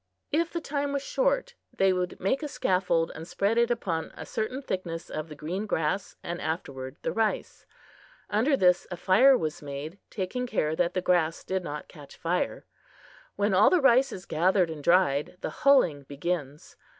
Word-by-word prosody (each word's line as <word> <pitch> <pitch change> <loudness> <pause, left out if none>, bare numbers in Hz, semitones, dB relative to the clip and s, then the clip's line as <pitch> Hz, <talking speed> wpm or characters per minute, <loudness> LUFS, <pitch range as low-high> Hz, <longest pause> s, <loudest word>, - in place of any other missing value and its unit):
If 330 +2 +1
the 340 - -3
time 285 -1 -2
was 280 -1 -1
short, - - 0 0.2
they 195 -1 +3
would 180 -1 -2
make 265 +10 0
a 300 - -3
scaffold 180 - +1
and 160 +1 -8
spread 205 +5 +1
upon 175 -9 -1
it - - -16
a - - -7
certain 255 +6 -3
thickness 175 -6 -4
of 155 +1 -4
the 150 - -8
green 180 +8 -4
grass 165 +3 -1
and 175 0 -4
afterward 135 -4 -4
the - - 0
rice. 220 -1 -2 0.6
Under 245 +7 +2
this 180 -4 +3
a 175 - -5
fire 250 +10 +5
was 155 -2 -3
made, 145 +5 -7
taking 225 +6 -3
care 160 -9 0
that 175 +1 0
the 185 - +1
grass 170 -3 +1
did 190 -1 -2
not 150 -2 -6
catch 145 -4 -13
fire. 175 +2 -1 0.7
When 205 0 +1
all 195 +3 +6
the 365 - +4
rice 270 -1 +5
is 185 -3 -8
gathered 175 +1 +2
and 150 -2 -7
dried, 170 -2 +2
the - - -3
hulling 260 - +4
begins. 145 0 -4
185 Hz, 180 wpm, -28 LUFS, 160-235 Hz, 0.7 s, all